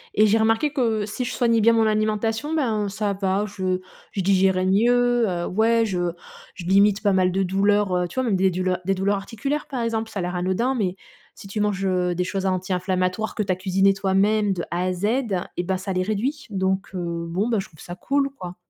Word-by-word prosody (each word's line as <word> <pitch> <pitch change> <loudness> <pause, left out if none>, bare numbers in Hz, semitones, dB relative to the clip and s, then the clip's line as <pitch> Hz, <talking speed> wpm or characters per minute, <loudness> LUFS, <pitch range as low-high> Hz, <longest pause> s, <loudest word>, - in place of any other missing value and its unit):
Et 215 - +5
j'ai 215 +2 +3
remarqué 225 +7 +2
que 225 -6 0
si 215 +4 -4
je 250 - -3
soignais 230 -3 +2
bien 230 +2 +5
mon 225 -1 +3
alimentation, 220 +7 0
ben, 220 -8 0
ça 205 0 -2
va, 195 +1 0
je 185 -2 -2 0.3
je 195 - -2
digérais 190 -1 +2
mieux, 240 +3 +3
heu 175 -1 -2
ouais, 225 +3 +2
je 175 -4 -1 0.4
je 175 - -8
limite 200 +3 +3
pas 200 -2 +3
mal 185 -1 +3
de 195 +1 0
douleurs, 195 0 +2
heu, 180 0 0
tu - - -13
vois? - - +1
Même 220 -6 +1
des 190 0 +3
douleurs 185 0 -1
des 195 0 +1
douleurs 200 +2 +1
articulaires, 275 +9 -4
par 250 -4 -3
exemple, 225 -1 -2
ça 210 - -8
a - - -1
l'air 180 0 -3
anodin, 190 +9 0
mais 190 -7 -1 0.4
si 195 - -12
tu 210 +2 -4
manges, 200 -2 0
heu, 180 -1 0
des 180 - 0
choses 195 +1 -2
anti-inflammatoires 185 +2 -1
que 210 - 0
tu 190 - -1
as 185 - +2
cuisinées 195 +1 +2
toi-même 200 +2 +2
de 175 -2 -4
A 175 +1 -1
à 185 - 0
Z, 180 +3 -3 0.5
et 175 - 0
bah, 190 +1 -1
ça 190 +1 -4
les 185 - 0
réduit. 235 +10 -2
Donc 190 0 -1
heu, 170 -1 -3
bon, 195 +7 -1
bah, 225 -4 +1
je - - -5
trouve 155 -4 -21
ça 175 - -8
cool, 275 +6 0
quoi. 180 -9 -9
195 Hz, 230 wpm, -23 LUFS, 185-220 Hz, 0.5 s, Et